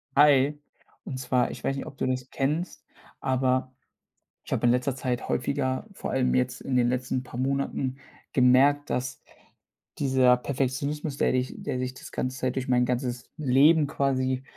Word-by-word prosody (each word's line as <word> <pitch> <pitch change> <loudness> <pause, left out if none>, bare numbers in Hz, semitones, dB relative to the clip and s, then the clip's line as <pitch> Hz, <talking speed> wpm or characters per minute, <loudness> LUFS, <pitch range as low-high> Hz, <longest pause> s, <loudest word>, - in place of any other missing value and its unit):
Hi. 145 0 +5 0.5
Und 130 - -5
zwar, 125 -1 +1
ich - - -9
weiß 135 - 0
nicht, 135 - -5
ob 135 - -11
du - - -1
das 130 0 -2
kennst, 150 +6 -2 0.3
aber 130 -1 0 0.7
ich - - -13
habe - - +1
in 120 - +5
letzter 125 +1 0
Zeit 130 -1 -3
häufiger- 130 0 -1
vor - - -5
allem 130 -1 +1
jetzt 125 0 0
in 135 - -2
den 120 -1 +3
letzten 125 0 -1
paar 125 -1 -8
Monaten- 135 0 -1 0.4
gemerkt, 135 +3 +4
dass 125 0 -3 0.8
dieser 130 -2 +4
Perfektionismus, 140 +3 -2
der - - +2
dich 130 0 -1
der 125 - -3
sich 130 0 -3
das - - -11
ganze 130 +1 -3
Zeit 130 0 -1
durch 130 -1 -2
mein 125 -1 +3
ganzes 125 -1 -3
Leben 150 +2 +4
quasi, 130 -2 0
130 Hz, 170 wpm, -27 LUFS, 125-140 Hz, 0.8 s, Hi